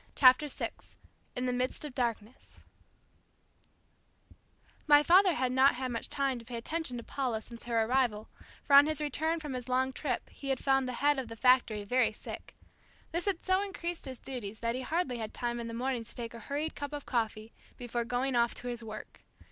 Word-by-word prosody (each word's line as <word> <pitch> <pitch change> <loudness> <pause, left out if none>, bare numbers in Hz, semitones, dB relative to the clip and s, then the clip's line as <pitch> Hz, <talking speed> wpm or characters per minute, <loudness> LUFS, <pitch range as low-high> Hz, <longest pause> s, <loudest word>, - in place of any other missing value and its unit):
CHAPTER 260 +2 +6
SIX 285 - -5 0.4
IN 250 - -1
THE 250 - 0
MIDST 255 +4 -1
OF 290 - -7
DARKNESS 235 -2 -4 2.3
My 295 0 +7
father 365 +2 +6
had 250 0 0
not 260 +1 +5
had 255 0 -3
much 230 - -4
time 275 -3 0
to - - -11
pay 240 0 -5
attention 280 +1 -3
to 235 - -6
Paula 250 -4 -2
since 230 +1 -10
her 230 -2 +2
arrival; 230 -3 +1 0.4
for 280 - -1
on 285 +1 +9
his 310 -1 +1
return 315 +3 0
from 300 -4 -5
his 250 0 -5
long 260 +1 +1
trip 255 -3 -2
he 275 - -7
had 270 - +2
found 270 -1 +2
the 250 - -3
head 290 -1 +4
of 260 - -4
the 230 - -8
factory 235 -3 +3
very 245 +2 +2
sick. - - -9 0.6
This 340 +2 -2
had 390 -4 -1
so 375 +1 +3
increased 350 -4 -4
his 260 -2 -4
duties 220 -6 -6
that 230 0 0
he 255 - -3
hardly 265 -3 -1
had 220 -1 -5
time 240 0 -2
in 235 - -4
the 230 - -5
morning 250 0 -1
to 225 - -9
take 235 -1 -6
a 230 - -8
hurried 295 +6 -3
cup 285 0 -6
of 290 -1 -5
coffee, 220 -2 -2 0.2
before 240 -1 -2
going 250 +2 -1
off 235 0 +2
to 245 - -5
his 240 -1 -5
work. 215 -1 -9
255 Hz, 205 wpm, -31 LUFS, 235-285 Hz, 2.3 s, on